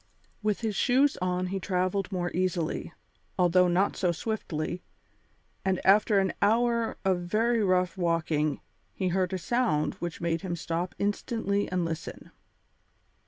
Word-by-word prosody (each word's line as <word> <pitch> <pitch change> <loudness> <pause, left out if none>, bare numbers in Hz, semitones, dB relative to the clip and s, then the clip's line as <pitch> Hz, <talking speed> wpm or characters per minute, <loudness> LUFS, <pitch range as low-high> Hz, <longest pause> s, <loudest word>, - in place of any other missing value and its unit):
With 210 0 0
his 220 -3 -1
shoes 270 +5 +3
on 180 0 0
he 195 +1 -2
travelled 185 +1 -1
more 175 -2 -2
easily, 175 -2 -1 0.5
although 180 0 +4
not 180 +3 +2
so 180 -2 +1
swiftly, 175 -3 -3 0.8
and 190 -1 +1
after 205 +2 +5
an 190 -2 +2
hour 230 +2 +2
of 190 -2 +2
very 220 +6 +1
rough 185 -1 +1
walking 160 -4 0 0.3
he 185 -2 0
heard 185 0 0
a 190 - -1
sound 185 -7 0
which 175 -1 -4
made 170 -1 -1
him 180 -3 -3
stop 170 +2 -3
instantly 205 -1 -1
and 180 -2 0
listen. 165 -1 -6
185 Hz, 140 wpm, -28 LUFS, 175-205 Hz, 0.8 s, after